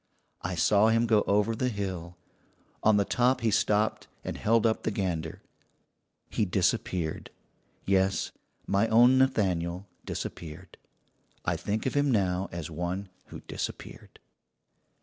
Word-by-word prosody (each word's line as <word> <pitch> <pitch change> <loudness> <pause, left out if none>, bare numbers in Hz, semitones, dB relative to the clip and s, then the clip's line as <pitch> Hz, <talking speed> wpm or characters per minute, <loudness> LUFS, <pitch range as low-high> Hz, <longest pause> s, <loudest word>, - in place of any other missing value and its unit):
"I 95 0 -3
saw 100 +5 +4
him 115 +1 +3
go 110 -2 +4
over 105 +3 +2
the 125 +3 0
hill. 95 -5 -5 0.6
On 110 -1 +4
the 100 - +2
top 125 +3 +2
he 115 -1 +2
stopped 105 +1 +1 0.2
and - - -4
held 115 +1 +2
up 110 -1 +2
the - - -1
gander. 85 -6 -3 0.8
He - - -1
disappeared; 90 -3 -1 0.6
yes, 95 -2 +1 0.3
my 100 +3 +2
own 120 +4 +6
Nathaniel 95 -8 +1 0.2
disappeared. 85 +2 -7 0.7
I - - +1
think 105 +2 -3
of 130 - 0
him 145 0 +2
now 95 -4 +1
as 85 -2 -6
one 90 +4 -3 0.2
who - - -10
disappeared. - - -7
100 Hz, 130 wpm, -28 LUFS, 90-110 Hz, 0.8 s, own